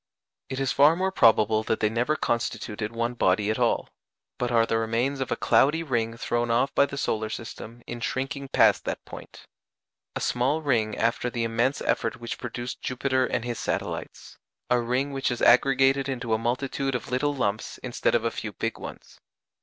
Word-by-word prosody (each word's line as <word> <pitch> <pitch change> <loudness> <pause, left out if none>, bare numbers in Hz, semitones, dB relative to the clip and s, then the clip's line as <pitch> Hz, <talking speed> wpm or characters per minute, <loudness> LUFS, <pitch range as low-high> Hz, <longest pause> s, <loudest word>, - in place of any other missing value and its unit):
It 130 - -4
is 135 -2 0
far 145 +4 +5
more 190 +2 0
probable 110 - +4
that 110 0 -1
they 105 - +2
never 120 +7 0
constituted 110 -4 -2
one 115 +1 -2
body 105 -2 +2
at 110 - -2
all, - - +1 0.5
but 125 -1 -1
are 115 -1 +4
the 115 0 0
remains 115 +5 0
of 135 - -3
a - - +2
cloudy 155 +5 +3
ring 115 -6 -1
thrown 120 0 -1
off 125 +4 +2
by 140 - +4
the 140 - -7
solar 110 -5 -1
system 115 +1 -8
in 120 - -6
shrinking 135 +4 -3
past - - +4
that - - -4
point: - - -11 0.7
a - - -1
small 135 +6 0
ring 110 -7 +1
after 115 +2 0
the 120 -1 -2
immense 115 +4 0
effort 115 - -1
which 120 0 -5
produced 120 0 -5
Jupiter 130 0 0
and 120 -1 -2
his 120 -1 -3
satellites: - - -4 0.3
a 125 - +4
ring 130 +4 -1
which 135 -1 -1
has 120 -2 -1
aggregated 135 +2 +4
into 120 -4 -2
a 110 - +2
multitude 135 +3 -1
of 125 - -5
little 145 +3 0
lumps 110 -5 -2
instead 120 -1 0
of 115 - +1
a 115 - +1
few 105 -2 -5
big - - -3
ones. - - -10
120 Hz, 190 wpm, -26 LUFS, 115-135 Hz, 0.7 s, far